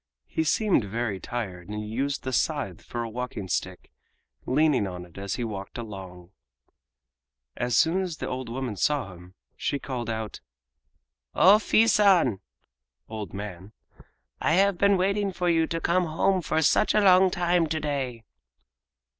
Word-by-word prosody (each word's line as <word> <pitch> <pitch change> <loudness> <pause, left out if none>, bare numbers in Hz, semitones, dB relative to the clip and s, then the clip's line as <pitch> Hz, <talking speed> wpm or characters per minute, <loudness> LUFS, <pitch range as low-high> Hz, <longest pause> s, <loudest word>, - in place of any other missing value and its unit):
He 160 - -2
seemed 200 - +2
very 110 -1 -3
tired 95 -7 -5
and 105 0 -5
used 135 +6 -2
the 130 - -4
scythe 135 - -1
for 120 -1 -5
a 115 - -5
walking 120 -4 -5
stick, 90 0 -4 0.6
leaning 140 -6 +2
on 90 -1 -7
it 85 - -20
as 100 0 -3
he 125 - -3
walked 100 -2 -6
along. 95 -6 -9 1.2
As 120 -2 0
soon 175 +4 +3
as 175 -4 -4
the - - -4
old 130 -2 -4
woman 125 -2 -4
saw 130 -2 0
him 90 +1 -15 0.2
she 140 - -2
called 125 -4 -5
out: 110 -1 -4 0.9
"O 195 +4 +7
Fii 220 +1 +3
San! 190 - +4 0.7
(old 110 -2 -6
man) 100 0 -8 0.7
I 155 - +2
have 195 +1 +3
been 200 -1 +4
waiting 200 +2 0
for 180 -1 -1
you 165 -1 +2
to 165 - -2
come 175 +2 +1
home 180 +4 +1
for 160 -1 0
such 215 - +3
a 210 - +5
long 190 -1 +6
time 175 -1 +1
to 155 +1 -2
day!" 135 -6 -3
130 Hz, 160 wpm, -26 LUFS, 105-175 Hz, 1.2 s, O